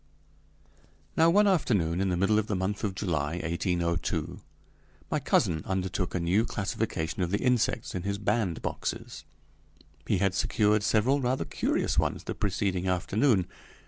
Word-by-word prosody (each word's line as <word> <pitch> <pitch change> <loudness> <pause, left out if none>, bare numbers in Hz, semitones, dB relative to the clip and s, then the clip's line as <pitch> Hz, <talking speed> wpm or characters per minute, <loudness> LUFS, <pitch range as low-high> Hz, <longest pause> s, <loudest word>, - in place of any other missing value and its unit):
Now 165 +1 +5
one 205 +5 +5
afternoon 100 - +2
in 95 - +1
the 90 - 0
middle 100 +4 +3
of 110 - -2
the 105 - -1
month 95 +2 -2
of 100 -3 -1
July, 80 -6 -1
1802, 85 0 -1 0.7
my - - +1
cousin 80 -2 +1
undertook 95 -1 -2
a - - +1
new 90 +6 +2
classification 100 -6 -2
of 90 - 0
the 100 - +1
insects 125 +1 0
in 90 - -3
his 100 +2 -2
bandboxes. 105 -4 -2 0.8
He 105 - +2
had 95 0 +1
secured 105 +2 +2
several 115 +7 +2
rather 130 +1 0
curious - - 0
ones - - -1
the - - -4
preceding 95 -2 -1
afternoon. 95 +3 +2
100 Hz, 145 wpm, -28 LUFS, 90-110 Hz, 0.8 s, Now